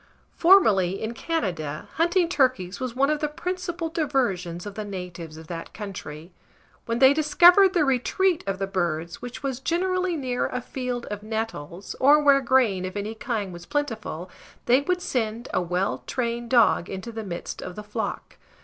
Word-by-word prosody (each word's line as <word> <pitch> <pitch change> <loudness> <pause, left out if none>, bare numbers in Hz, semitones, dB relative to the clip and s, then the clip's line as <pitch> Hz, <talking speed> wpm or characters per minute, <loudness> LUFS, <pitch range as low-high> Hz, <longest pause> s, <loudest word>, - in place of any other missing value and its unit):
Formerly, 205 - +5
in 220 +1 -3
Canada, 175 - -3
hunting 345 +2 +3
turkeys 255 - +1
was 255 -2 -4
one 275 +3 +3
of 305 - 0
the 300 - 0
principal 350 +2 -4
diversions 240 - -1
of 205 - -6
the 215 - -5
natives 180 -5 -7
of 160 - -10
that 165 0 -7
country. 180 -6 -7 0.6
When 230 0 0
they 265 +2 +7
discovered 350 +6 +6
the 320 -4 +4
retreat 310 +7 +1
of 195 -1 -1
the 195 - -1
birds, 170 -4 -2
which 245 +3 -8
was 265 -3 -2
generally 365 +4 0
near 255 -5 -1
a 250 - -3
field 250 -1 -4
of 205 0 -4
nettles, 215 -6 -5
or 290 +3 +6
where 280 -2 +5
grain 240 -8 +2
of 185 +2 -5
any 205 +2 -3
kind 220 -4 -3
was 175 0 -10
plentiful, 220 - -3 0.3
they 250 +3 +5
would 360 +4 -1
send 230 -3 -2
a 185 - +2
well 180 +3 -1
trained 235 -1 -2
dog 235 -7 +4
into 190 +5 -6
the 225 -1 -5
midst 175 -4 -6
of 180 - -7
the 210 - -7
flock. 210 +2 -5
235 Hz, 175 wpm, -25 LUFS, 190-290 Hz, 0.6 s, they